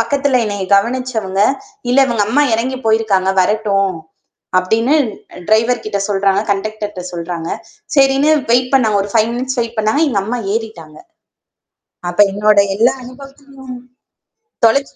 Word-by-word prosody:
பக்கத்தில 270 +2 +1
என்னைய 205 -2 -3
கவனிச்சவங்க, 220 -3 -1 0.5
"இல்ல 255 - +3
இவங்க 230 -4 0
அம்மா 290 +6 +3
இறங்கிப் 255 +2 -2
போயிருக்காங்க, 220 -4 +2
வரட்டும்" 195 -2 0 0.6
அப்படின்னு 225 +9 +1 0.5
டிரைவர்கிட்ட 220 -1 +1
சொல்றாங்க, 195 -1 +1
கண்டக்டர்ட்ட 210 0 -3
சொல்றாங்க. 170 -1 -5 0.5
சரின்னு 275 +2 +4 0.2
வெயிட் 250 +2 +2
பண்ணாங்க. 220 -6 +3
ஒரு 200 - -8
5 225 0 +3
மினிட்ஸ் 260 +1 -3
வெயிட் 230 0 -4
பண்னாங்க. 220 +8 +1
எங்க 205 -7 0
அம்மா 240 +3 -3
ஏறிட்டாங்க. 195 -9 -6 1.1
அப்ப 175 - -8
என்னுடைய 205 0 +3
எல்லா 235 +3 +3
அனுபவத்திலும் 275 0 -12 0.9
தொலைச்ச 275 +5 +1
220 Hz, 120 wpm, -16 LUFS, 200-255 Hz, 1.1 s, சரின்னு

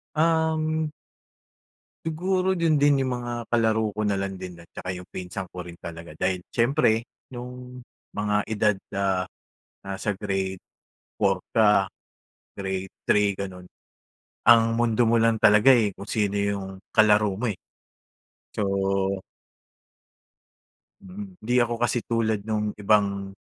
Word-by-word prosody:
Um 160 -1 +1 1.1
Siguro, 185 +3 0
do'n 165 -2 +2
din 145 -1 +4
'yung 130 - -1
mga 120 0 -5 0.2
kalaro 110 -2 +2
ko 105 - -4
na 100 - +1
lang 95 -1 -3
din 90 -1 -7 0.2
tsaka 90 - -7
'yung 90 - -8
pinsan 90 0 -6
ko 90 - -8
rin 85 - -9
talaga. 85 -1 -9
Dahil 90 +2 0
siyempre, 115 -2 +2 0.3
no'ng 125 0 -8 0.3
mga 105 0 0
edad, 105 -1 +2 0.2
ah, 95 -2 +1 0.6
nasa 100 +1 -3
Grade 95 -2 -3 0.5
4 - - +2 0.2
ka, 105 -3 +5 0.7
Grade 95 -1 -3 0.2
3, 105 -1 +3
gano'n, 90 -2 -7 0.8
ang 115 -1 +6
mundo 115 0 +2
mo 115 - +4
lang 115 -1 +3
talaga, 105 +6 +7
eh, 110 -6 +2
kung 100 - -8
sino 100 -2 0
'yung 100 -1 -1 0.3
kalaro 105 -2 +4
mo, 125 - 0
eh. 100 - -2 1.0
So - - -1 2.4
Mm. 195 -1 -10
'Di 120 +3 -1
ako 120 0 -2
kasi 120 0 0
tulad 110 -3 0
nung 105 -1 -2
ibang 100 -1 +1
110 Hz, 130 wpm, -25 LUFS, 100-120 Hz, 2.4 s, talaga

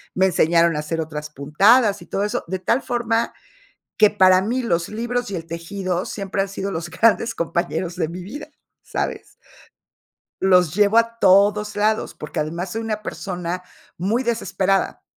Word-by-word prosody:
me 190 - +3
enseñaron 170 -1 +3
a - - -1
hacer 150 +2 -3
otras 150 -1 -6
puntadas 200 - +3
y - - -13
todo 195 - -2
eso, 210 - -2
de 190 +2 -2
tal 230 +8 +1
forma 235 -2 -1 0.7
que 215 - +7
para 185 -2 +5
mí 240 +7 -1
los 170 -7 0
libros 240 +1 -3
y 195 - -3
el 165 -1 -6
tejido 180 +2 -3
siempre 195 -1 -3
han 195 - -4
sido 195 0 -4
los 165 0 -4
grandes 230 +5 +2
compañeros 170 +1 -2
de 165 -3 -1
mi 175 +2 -7
vida, 260 +11 -8 0.3
¿sabes? - - -4 1.1
Los 180 -4 +4
llevo 205 +3 +3
a 230 0 +2
todos 205 +2 +4
lados, 215 +1 0
porque 150 +1 -6
además 170 +4 -3
soy 225 - -3
una 215 -1 -3
persona 180 -3 -4 0.3
muy 215 +9 0
desesperada. 195 -5 0
190 Hz, 165 wpm, -21 LUFS, 170-215 Hz, 1.1 s, que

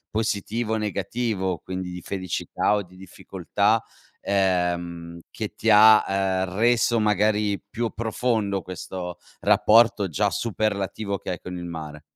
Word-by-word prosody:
positivo 110 +1 -1
o - - 0
negativo 105 -2 -2
quindi 95 0 -6
di 90 - -6
felicità 95 +2 -1
o 105 - -1
di 90 0 -18
difficoltà, 95 +3 -1 0.4
ehm, 85 -3 -1
che 110 -2 -6
ti 115 - -1
ha, 110 0 +7
ehm, 95 -1 -1
reso 120 +1 +3
magari 105 0 +1
più 115 +2 -2
profondo 110 -3 -1
questo 90 0 -7 0.2
rapporto 110 -2 +4
già 80 - 0
superlativo 100 -1 -2
che 90 - -6
hai 90 - -4
con 90 0 -7
il 85 - -6
mare? 75 -3 -7
100 Hz, 135 wpm, -24 LUFS, 90-110 Hz, 0.4 s, ha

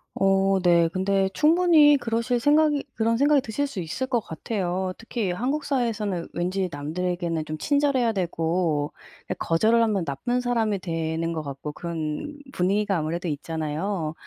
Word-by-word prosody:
어 195 0 +3
네. 170 -2 +4
근데 195 +2 +1
충분히 310 - +5
그러실 235 0 -1
생각이 295 +2 +3
그런 230 +1 +1
생각이 285 +2 +4
드실 255 +5 -2
수 275 -8 -6
있을 180 +10 -3
것 255 -2 +1
같아요. 185 0 -3
특히 225 -4 -2
한국 270 +10 -2
사회에서는 220 -10 -1
왠지 185 +1 -1
남들에게는 165 +2 -2
좀 155 0 -5
친절해야 280 - +2
되고 165 -5 -1 0.4
약 - - -2
거절을 220 +8 +3
하면 205 -6 +1
나쁜 200 - -1
사람이 230 -4 0
되는 165 -1 -2
것 160 - -3
같고 140 0 -6
그런 165 - -5 0.2
분위기가 195 +2 +1
아무래도 165 +3 -3
있잖아요? 160 +3 -3
195 Hz, 335 characters per minute, -25 LUFS, 165-240 Hz, 0.4 s, 충분히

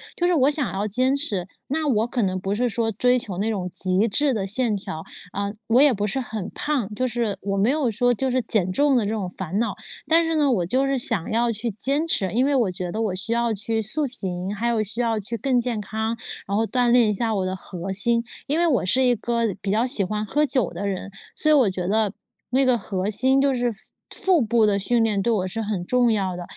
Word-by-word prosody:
就 350 - -1
是 355 - +3
我 285 -3 +4
想 290 -7 0
要 205 +2 -2
坚 255 +6 +2
持， 205 - -2 0.2
那 310 +2 -1
我 225 -3 +1
可 240 -3 -1
能 185 -1 -1
不 195 +2 -2
是 245 +3 +1
说 225 0 -1
追 250 +4 +2
求 195 -6 -3
那 215 +3 -1
种 185 -4 -3
极 185 +4 +2
致 285 +5 +2
的 200 -4 -2
线 220 +2 +2
条， 160 -5 -6 0.3
呃， 200 +1 -3
我 240 +4 +4
也 290 -4 +5
不 205 0 -2
是 265 - -2
很 220 -6 -5
胖， 250 -9 -2
就 255 +2 0
是 235 -4 -2
我 195 0 -2
没 205 +4 +2
有 280 -4 +1
说 245 +3 +2
就 260 +3 -2
是 255 - +1
减 205 -5 +1
重 285 +5 +2
的 225 - +1
这 205 - -2
种 205 -5 -3
烦 190 +2 -4
恼。 235 - -1 0.3
但 330 +1 +4
是 325 0 -1
呢， 290 -3 +2
我 180 -7 +1
就 260 +9 +1
是 275 - 0
想 230 -7 +3
要 235 +1 +1
去 230 +2 -3
坚 275 +10 +1
持， 190 - 0
因 250 +5 +2
为 285 - +1
我 230 -8 +1
觉 180 -1 -5
得 220 +4 -3
我 200 -4 -1
需 210 +5 -1
要 235 -1 +1
去 220 +2 -2
塑 275 +7 -1
形， 190 -5 -2
还 230 +4 -2
有 230 -2 +1
需 225 +4 -2
要 225 -2 0
去 230 +3 -5
更 260 -1 +1
健 235 -3 -2
康， 220 +3 -3 0.3
然 200 +1 -1
后 225 - +2
锻 245 +3 +1
炼 235 -3 +4
一 - - +1
下 220 +1 -1
我 190 -1 -1
的 185 - -2
核 185 0 -7
心。 230 +4 +1 0.2
因 295 +3 0
为 345 - +3
我 255 - +1
是 260 +8 +2
一 250 -1 +4
个 230 -1 -1
比 195 - -4
较 225 +4 +2
喜 245 -6 +4
欢 210 +2 -2
喝 295 +8 +1
酒 255 -9 +1
的 200 - -4
人， 195 0 -4 0.2
所 310 - 0
以 - - +6
我 265 -8 +4
觉 185 -1 -4
得， 210 -1 +1 0.4
那 265 +2 +2
个 250 -2 +3
核 195 -1 -3
心， 260 +6 +4
就 275 -1 +2
是 245 -1 0
腹 195 - -13 0.6
腹 - - +1
部 225 -1 +2
的 200 -1 +1
训 230 +4 +2
练 210 -3 +1
对 235 - 0
我 190 -4 0
是 225 +5 -4
很 205 -4 -3
重 245 +2 +2
要 190 -4 -1
的。 175 - -6
225 Hz, 280 characters per minute, -23 LUFS, 200-255 Hz, 0.6 s, 以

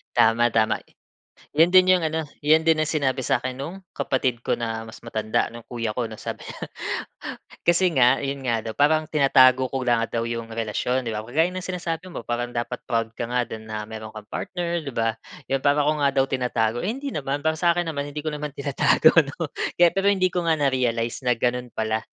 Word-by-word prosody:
Tama, 120 +1 +4
tama. 110 -1 +2 0.8
'Yan 165 +2 +6
din 185 0 +7
'yung 185 - +5
ano, 160 0 -1 0.2
yan 155 +2 +4
din 160 -1 +3
ang 155 - +1
sinabi 140 -4 0
sa'kin 130 +2 -1
no'ng 185 +7 -6
kapatid 130 -3 -1
ko - - 0
na 115 -1 -4
mas 110 - -12
matanda, 110 -1 -1
no'ng 115 -1 -11
kuya 115 -3 -3
ko 120 +1 -2
'no, 110 - -9
sabi - - -7
niya. - - -8 1.0
Kasi 175 +1 +4
nga, 130 +1 +5
yun 140 0 -3
nga 115 -2 0
daw, 110 -1 -5
parang 155 +2 +3
tinatago 130 -3 +5
ko 135 -1 -2
nga 115 -1 +2
daw 115 -1 -1
yung 115 -1 -4
relasyon, 115 +3 -1
'di 115 - -2
ba. 105 - -2
Kagaya 160 +9 +1
ng 185 - -4
sinasabi 180 -1 -4
mo, - - -6
parang 120 0 -2
dapat 120 +1 -3
proud 115 -1 0
ka 120 - -3
nga 125 0 +1
din 110 0 -8
na 105 0 -3
mayro'n 110 -1 -7
kang 105 -1 -8
partner, 175 -2 -3
'di 140 - -5
ba. 115 -1 +1 0.4
'Yon, 135 - +2
para 145 0 +3
ko 150 - +3
nga 140 -1 +3
daw 135 - +4
tinatago, 120 -3 0
eh, 195 - -2
hindi 275 +2 -5
naman. 145 0 -3
Para 160 0 0
sa 170 -1 +3
akin 175 -1 -1
naman, 140 -1 -3
hindi 150 +1 -5
ko 155 - -2
naman 150 -1 -5
tinatago 140 -1 +4
'no. - - -5 0.2
Kaya 175 -1 +6
pero 195 +1 0
hindi 185 -3 +3
ko 175 -2 -1
nga 160 - +4
na-realize 125 -3 0
na 125 - +4
gano'n 125 +1 -1
pala 110 0 0
130 Hz, 215 wpm, -24 LUFS, 115-155 Hz, 1.0 s, din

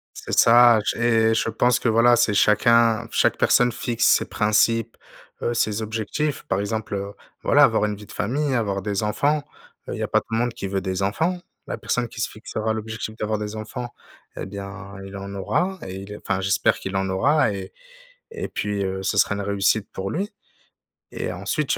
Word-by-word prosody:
C'est - - -4
ça, 120 -1 +7
j'ai 115 -1 +2
je 110 - 0
pense 120 +2 +2
que 125 - +1
voilà, 115 +2 +5
c'est 115 -3 +2
chacun 115 +2 +4
f - - -25
chaque - - +3
personne 125 0 +4
fixe 115 0 -1
ses - - +4
principes, 115 +1 +1 0.5
heu, 120 - 0
ses 110 -1 0
objectifs. 110 +7 -2
Par 95 - 0
exemple, 105 +1 -3
heu, 100 0 -4 0.3
voilà - - +5
avoir - - +4
une 105 -1 -2
vie 105 +1 -12
de - - -15
famille, 135 +6 -1
avoir 100 -5 -1
des 100 0 -1
enfants, 145 +8 +1 0.5
heu, - - -3
il - - -7
y - - -1
a - - -1
pas - - +3
tout - - -18
le 115 - +1
monde 120 0 0
qui 100 - -5
veut 95 0 -2
des 95 0 -3
enfants. 160 - 0 0.3
La - - -4
personne 125 -1 -1
qui 115 - -7
se - - 0
fixera 110 0 -3
l'objectif 110 0 -5
d'avoir 110 -1 -2
des 105 0 -5
enfants 115 +3 -6 0.5
et - - -5
bien 100 0 -8
il 95 +1 -9
en 100 0 -7
aura 180 - -1
et 95 - -6
il 100 +1 -8
est 105 - -6
enfin 95 - -2
j'espère 95 -1 +2
qu'il 95 0 -6
en 95 0 -1
aura 135 +7 +2
et 95 -2 -7 0.6
et 450 - -4
puis, 100 -1 -2
heu, 95 0 -3
ce 100 - -1
serait 100 - +3
une 100 - -3
réussite 100 +1 +1
pour 95 0 -4
lui, 195 - -2 0.8
et - - -4
ensuite, - - -1
il - - -1
110 Hz, 210 wpm, -23 LUFS, 100-115 Hz, 0.8 s, ça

